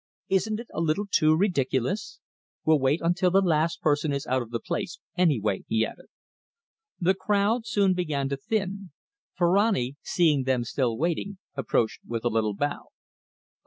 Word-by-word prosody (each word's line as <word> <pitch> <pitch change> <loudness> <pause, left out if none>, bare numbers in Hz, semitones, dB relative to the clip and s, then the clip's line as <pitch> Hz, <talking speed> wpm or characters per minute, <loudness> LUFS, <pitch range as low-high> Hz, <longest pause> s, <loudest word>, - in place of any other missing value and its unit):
Isn't 215 +3 +1
it 235 - -7
a 160 - -2
little 165 +5 0
too 155 -5 +3
ridiculous! 160 - 0 0.5
We'll 155 -1 +4
wait 135 +4 +1
until 175 +2 +2
the 190 +2 +4
last 165 -3 +1
person 150 0 +1
is 140 0 -2
out 130 +1 +1
of 120 - -7
the 115 0 -3
place, - - -4 0.2
anyway," 125 - +1
he 110 0 +2
added. - - -10 0.9
The 185 +2 +3
crowd 210 +4 0
soon 200 -3 +3
began 155 -6 -1
to 140 - -2
thin. 200 - -3 0.4
Ferrani, 175 - +2
seeing 150 -7 +2
them 130 -2 +1
still 120 -1 -1
waiting, 175 +6 -2 0.2
approached 120 -4 0
with 115 0 -5
a - - +3
little 110 -2 0
bow. 145 +6 -3
155 Hz, 160 wpm, -26 LUFS, 130-190 Hz, 0.9 s, We'll